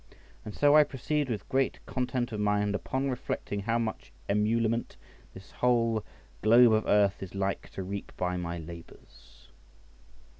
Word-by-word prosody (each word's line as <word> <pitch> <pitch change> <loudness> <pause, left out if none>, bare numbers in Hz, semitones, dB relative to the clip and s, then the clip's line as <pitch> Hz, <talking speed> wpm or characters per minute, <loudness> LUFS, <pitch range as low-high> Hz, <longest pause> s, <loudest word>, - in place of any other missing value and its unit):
And 105 - -8
so 145 0 +5
I 155 - +8
proceed 145 +1 -2
with 105 -5 -4
great 135 0 0
content 125 -1 -2
of 105 - -4
mind 105 0 +1
upon 130 +8 -2
reflecting 100 -4 -4
how 115 +4 0
much 115 -2 -4 0.2
emolument 110 +3 0 0.4
this 95 +1 -12
whole 115 -3 +1 0.4
globe 115 +2 +6
of 110 0 +1
earth 100 -1 +3
is 95 0 -8
like 100 0 -2
to 95 - -4
reap 100 +2 -6
by 90 0 -1
my 85 -1 -3
labours. 80 -6 -13
110 Hz, 150 wpm, -29 LUFS, 100-120 Hz, 0.4 s, I